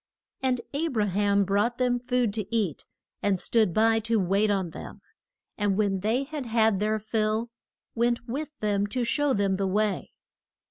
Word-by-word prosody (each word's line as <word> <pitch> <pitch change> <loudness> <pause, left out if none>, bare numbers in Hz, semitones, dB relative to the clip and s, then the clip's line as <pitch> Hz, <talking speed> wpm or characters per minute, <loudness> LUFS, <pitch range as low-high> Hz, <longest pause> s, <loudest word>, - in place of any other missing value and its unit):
And 255 -2 +1
A 310 +4 0
bra 220 -9 0
ham 200 +1 +2
brought 205 +5 +1
them 245 -1 +1
food 245 -3 0
to 215 -1 -4
eat, 200 -10 -1 0.4
and 200 -2 +1
stood 220 -2 +2
by 225 +4 +3
to 225 0 +1
wait 195 +3 +2
on 190 -4 0
them; - - -9 0.6
and 200 -1 +1
when 200 -3 +1
they 225 +7 0
had 285 -2 -6
had 220 -3 +2
their 215 +1 +1
fill, 220 +1 -1 0.4
went 235 +1 0
with 285 +6 -3
them 205 -1 +1
to 245 +4 -2
show 290 +3 +1
them 195 -3 +1
the 195 0 0
way. 210 +1 -1
215 Hz, 175 wpm, -27 LUFS, 200-240 Hz, 0.6 s, by